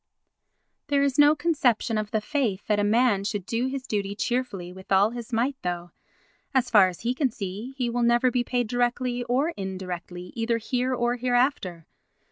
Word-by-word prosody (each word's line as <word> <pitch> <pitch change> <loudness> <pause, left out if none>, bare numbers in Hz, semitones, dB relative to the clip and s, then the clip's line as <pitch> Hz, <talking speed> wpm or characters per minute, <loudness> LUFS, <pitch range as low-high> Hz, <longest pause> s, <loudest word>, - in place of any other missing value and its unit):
There 285 -1 +2
is 280 0 0
no 295 +1 +7
conception 275 -8 +1
of 215 -1 -1
the 220 -1 0
faith 225 -6 -1
that 210 -1 +1
a - - +2
man 215 -1 +3
should 205 -2 -3
do 235 +5 -1
his 265 0 -4
duty 200 -4 -2
cheerfully 210 -7 -2
with 190 +1 -13
all 195 +3 +5
his 240 0 -7
might 245 +5 +1
though, 175 -1 -4 0.6
as 255 -1 +2
far 205 -4 +7
as 180 -2 -7
he 240 +2 0
can 265 0 +1
see, 215 +4 -6
he 250 -2 0
will 240 +1 -1
never 240 +2 +3
be 245 0 +1
paid 245 0 0
directly 245 +1 0
or 260 +6 +1
indirectly 185 - -6
either 230 0 0
here 250 +3 -1
or 240 0 0
hereafter. 245 - 0
235 Hz, 185 wpm, -26 LUFS, 200-255 Hz, 0.6 s, no